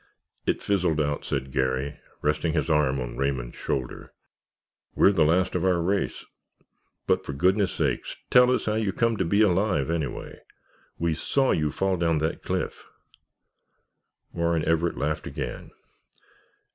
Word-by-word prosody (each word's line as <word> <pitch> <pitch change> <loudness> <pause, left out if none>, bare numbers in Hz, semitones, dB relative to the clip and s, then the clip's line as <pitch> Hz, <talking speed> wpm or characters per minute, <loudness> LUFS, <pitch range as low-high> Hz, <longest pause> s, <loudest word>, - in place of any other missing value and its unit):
"It - - 0
fizzled 90 -6 +1
out," 75 -1 -1
said 65 - -3
Garry, 65 +1 -1 0.2
resting 75 +2 +1
his 80 0 0
arm 70 -3 +2
on - - -5
Raymond's 65 -3 -2
shoulder. 65 -3 -4 0.8
"We're 100 - +6
the 90 -6 +3
last 90 +4 +2
of - - -1
our 90 -2 +3
race. 95 +4 -1 0.8
But, - - +1
for 70 - -5
goodness' 95 +6 +2
sakes, - - -1 0.2
tell 125 0 +7
us 125 - +1
how 105 - 0
you 110 -3 0
come 115 -1 +1
to 95 - +1
be 100 +6 +3
alive, 95 -6 +2
anyway? 80 -5 -4 0.6
We 85 -1 0
saw 135 - +1
you 75 -1 +1
fall 95 +4 0
down 85 -2 +1
that 80 +2 -2
cliff——" - - -3 1.5
Warren 85 -2 0
Everett 80 +1 +1
laughed 75 +1 -2
again. - - -5
85 Hz, 145 wpm, -26 LUFS, 75-95 Hz, 1.5 s, tell